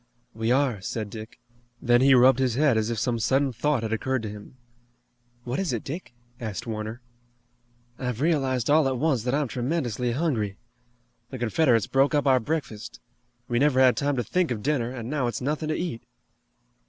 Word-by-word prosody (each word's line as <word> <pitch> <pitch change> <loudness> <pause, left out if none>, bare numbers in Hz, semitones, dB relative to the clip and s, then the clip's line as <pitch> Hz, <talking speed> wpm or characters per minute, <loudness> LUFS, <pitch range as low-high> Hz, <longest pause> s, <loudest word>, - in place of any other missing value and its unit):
"We 115 +1 -1
are," 130 -6 +1
said 105 0 -4
Dick. 110 +1 -9 0.4
Then 120 0 +3
he 135 0 +6
rubbed 130 +1 +6
his 130 -3 +1
head 140 -2 +3
as 110 0 0
if 115 - -2
some 115 +2 0
sudden 135 +3 +1
thought 130 +1 0
had 110 0 -2
occurred 130 +2 -1
to 105 - -4
him. 105 +4 -11 0.9
"What 125 +2 -3
is 185 -9 -1
it, 115 - -3
Dick?" 145 -3 -7 0.2
asked 110 +1 -5
Warner. 110 +1 -5 1.0
"I've 125 -3 -3
realized 135 -6 +1
all 150 -1 +4
at 130 -1 -1
once 140 -3 +1
that 125 +2 +1
I'm 145 -1 0
tremendously 125 -2 -2
hungry. 120 -9 -1 0.7
The 130 - -6
Confederates 120 -1 +2
broke 135 +2 +2
up 145 - +1
our 130 -2 +5
breakfast. 125 -5 -4 0.5
We 120 0 0
never 140 -1 +3
had 130 -2 +6
time 140 +4 0
to 120 - -1
think 180 - 0
of 110 -4 -3
dinner, 135 -6 0
and 120 -3 -6
now 135 -2 -1
its 120 - -3
nothing 150 +4 -2
to 155 - 0
eat." 170 -10 -4
125 Hz, 190 wpm, -26 LUFS, 115-140 Hz, 1.0 s, he